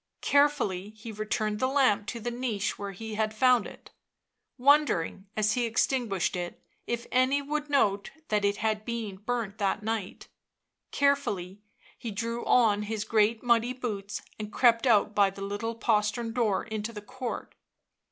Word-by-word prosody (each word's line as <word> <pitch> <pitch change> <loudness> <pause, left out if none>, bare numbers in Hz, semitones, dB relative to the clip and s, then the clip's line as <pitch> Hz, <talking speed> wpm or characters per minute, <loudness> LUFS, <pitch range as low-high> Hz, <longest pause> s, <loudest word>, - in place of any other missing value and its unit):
Carefully 285 -10 +2
he 225 +1 -8
returned 215 0 -2
the 260 - +2
lamp 260 -7 +2
to 235 - -4
the 240 +2 -3
niche 235 -4 -2
where 200 0 -4
he 220 +3 -7
had 215 0 -1
found 250 -1 +4
it; - - -14 0.7
wondering, 255 - +3
as 215 0 +2
he 240 0 +1
extinguished 230 -6 0
it, 175 -1 -5 0.3
if 235 0 -2
any 255 +2 +3
would 295 +1 -3
note 205 -8 +2 0.2
that 210 -1 +1
it 200 0 +1
had 215 -1 -1
been 225 -4 -4
burnt 220 -1 -3
that 200 +1 0
night; 220 -3 -4 0.6
carefully 210 -10 0 0.4
he 235 - -5
drew 230 +3 -3
on 215 -4 +4
his 210 0 -3
great 220 +1 +2
muddy 240 0 +3
boots 210 -5 -5 0.2
and 215 0 -5
crept 235 +1 +4
out 215 -2 +4
by 200 -1 +4
the 195 +1 -8
little 205 +3 -3
postern 225 +1 0
door 225 -5 +1
into 220 0 -4
the 210 -2 -8
court. 255 +2 -6
220 Hz, 160 wpm, -28 LUFS, 205-245 Hz, 0.7 s, found